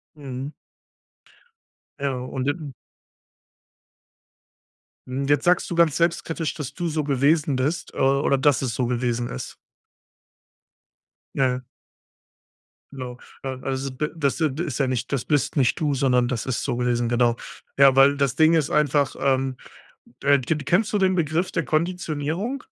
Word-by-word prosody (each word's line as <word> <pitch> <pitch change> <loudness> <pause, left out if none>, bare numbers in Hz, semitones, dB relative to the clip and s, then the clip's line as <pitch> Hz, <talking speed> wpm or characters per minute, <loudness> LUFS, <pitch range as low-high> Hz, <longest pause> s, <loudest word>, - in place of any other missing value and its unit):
Mhm. 135 0 -6 1.5
Ja, 140 -1 -1
und 130 0 -4
je 145 - +3 2.5
Mhm, 135 +2 -3
jetzt 145 +1 +2
sagst 180 0 +3
du 170 - -3
ganz 165 -4 +4
selbstkritisch, 165 -1 0
dass 150 -6 -6
du 175 -2 -3
so 155 -1 -1
gewesen 145 +1 +2
bist, 145 +7 -2
äh, - - -12
oder 135 +1 +2
dass 140 0 +3
es 120 -4 -2
so 125 -2 0
gewesen 120 -1 -1
ist. 60 - -6 1.8
Ja, 135 -2 +3
ja. 125 0 -2 1.3
Genau. 125 -2 -7 0.3
Ähm, 130 -1 -5
also 135 0 -2
be 150 +4 -3
das, 145 0 0
äh, 155 -2 +2
d 155 +6 -3
ist 145 -5 -4
ja 135 - +2
nicht, 130 +1 -2
das 135 -4 -1
bist 145 0 0
nicht 130 -3 +2
du, 150 -3 +1
sondern 125 -3 +2
das 120 -3 -3
ist 130 -3 -2
so 120 - -2
gewesen, 120 -1 0
genau. 120 -1 +2 0.4
Ja, 135 -1 +6
weil 140 +1 +6
das 135 -3 +1
Ding 160 +2 +5
ist 155 -3 +2
einfach, 145 -2 +2
ähm, 135 -1 +1 0.7
äh, 140 -1 +5
d 140 +5 -1
d 150 - -6
kennst 195 +8 +2
du - - +3
den 190 -1 +2
Begriff 170 +2 0
der 165 -3 -1
Konditionierung? 170 - -2
140 Hz, 160 wpm, -24 LUFS, 130-155 Hz, 2.5 s, Ja